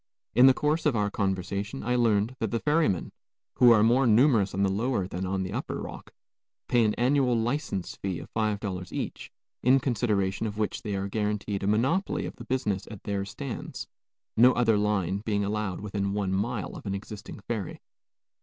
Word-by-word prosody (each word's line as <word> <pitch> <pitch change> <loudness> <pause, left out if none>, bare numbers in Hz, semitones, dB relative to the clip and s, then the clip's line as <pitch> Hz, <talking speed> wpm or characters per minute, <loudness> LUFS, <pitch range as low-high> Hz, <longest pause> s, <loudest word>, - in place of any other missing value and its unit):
In 125 +2 +7
the 130 - +7
course 155 +2 +1
of 140 - +2
our 105 -1 0
conversation 100 +4 -2
I 125 - 0
learned 115 0 +2
that 110 - -1
the 115 - -1
ferrymen, 150 - +1 0.5
who 125 - +7
are 110 -2 +6
more 120 +3 +4
numerous 115 -3 +4
on 100 - +1
the 95 - +2
lower 105 -1 0
than 95 +1 -4
on 95 0 -1
the 95 - -5
upper - - -3
Rock, - - -8 0.6
pay 120 -2 +3
an 105 -1 +1
annual 130 0 +2
license 115 - -2
fee 95 -3 -3
of - - -10
five 110 -2 0
dollars 95 -4 -5
each, - - -5 0.3
in 130 +2 +5
consideration 110 -5 0
of 105 0 -6
which 110 -1 -2
they 105 -2 -3
are 95 0 -2
guarantied 105 -1 -2
a 100 - -1
monopoly 130 - +1
of - - -7
the 120 - -9
business 105 -6 -1
at 105 -4 -10
their 100 -1 -2
stands, 130 +5 -6 0.5
no 125 +3 +7
other 115 -2 +3
line 105 -2 0
being 105 -1 -1
allowed 105 -2 -2
within 100 -1 -2
one 100 -2 -1
mile 105 +3 -2
of - - -9
an 100 - -1
existing 105 +2 -8
ferry. 105 -3 -4
105 Hz, 190 wpm, -27 LUFS, 100-120 Hz, 0.6 s, In